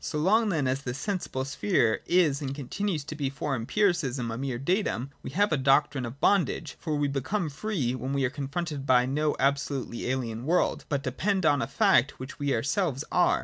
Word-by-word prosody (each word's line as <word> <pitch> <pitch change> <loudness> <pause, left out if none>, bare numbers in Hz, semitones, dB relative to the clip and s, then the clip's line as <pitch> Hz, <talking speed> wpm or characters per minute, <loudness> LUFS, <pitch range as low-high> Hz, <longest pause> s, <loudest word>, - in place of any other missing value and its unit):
So 150 - -3
long 210 +8 +3
then 160 -7 0
as 130 +2 0
this 125 -1 -4
sensible 175 -9 -3
sphere 110 -3 +1
is 160 -5 +3
and 135 -1 -3
continues 155 +4 -2
to 145 - -7
be 145 -3 -2
for 140 +1 -2
Empiricism 135 - 0
a - - -3
mere 130 0 -3
datum, 140 - -1
we - - -6
have 205 +8 +1
a 150 - +3
doctrine 135 -1 +2
of 125 +4 -9
bondage: 175 -5 +1
for 155 -3 -2
we 145 0 +1
become 150 +6 -2
free, 150 - -2
when 130 +1 -4
we 140 -1 +1
are 125 - -1
confronted 145 0 -4
by 125 -1 +5
no 150 +3 0
absolutely 140 -3 -1
alien 120 -3 -2
world, 175 +3 +1
but 140 -2 -1
depend 185 +8 0
upon 145 -2 +4
a - - -1
fact 195 -9 +3
which 130 +4 -8
we 145 -1 0
ourselves 140 - 0
are. 180 - +3
140 Hz, 200 wpm, -28 LUFS, 130-170 Hz, -, by